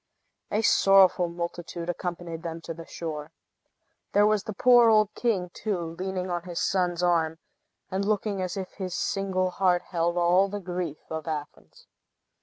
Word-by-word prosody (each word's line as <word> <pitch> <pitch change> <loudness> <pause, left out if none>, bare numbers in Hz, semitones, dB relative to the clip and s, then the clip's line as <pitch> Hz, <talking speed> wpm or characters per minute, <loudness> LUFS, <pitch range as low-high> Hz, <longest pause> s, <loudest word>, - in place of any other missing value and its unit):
A 215 +2 0
sorrowful 195 -4 +5
multitude 170 0 -5
accompanied 175 -1 -4
them 165 -1 -5
to 165 - -6
the 165 0 -10
shore. 155 -2 -6 0.8
There 205 +1 +5
was 210 -1 +2
the 215 - -4
poor 240 +2 +6
old 215 -1 +4
king, 195 -7 -1
too, 175 -6 -3
leaning 185 -1 -3
on 175 -1 -2
his 175 -1 -5
son's 180 -2 0
arm, 165 -2 +2 0.5
and 190 +1 -1
looking 205 -1 0
as 185 +1 -3
if 190 -1 -5
his 185 -3 -5
single 185 -2 -1
heart 180 -1 +2
held 170 0 -1
all 180 +3 +4
the 205 +1 -4
grief 175 -4 -4
of 160 -1 -4
Athens. 150 -2 -7
180 Hz, 160 wpm, -27 LUFS, 170-195 Hz, 0.8 s, poor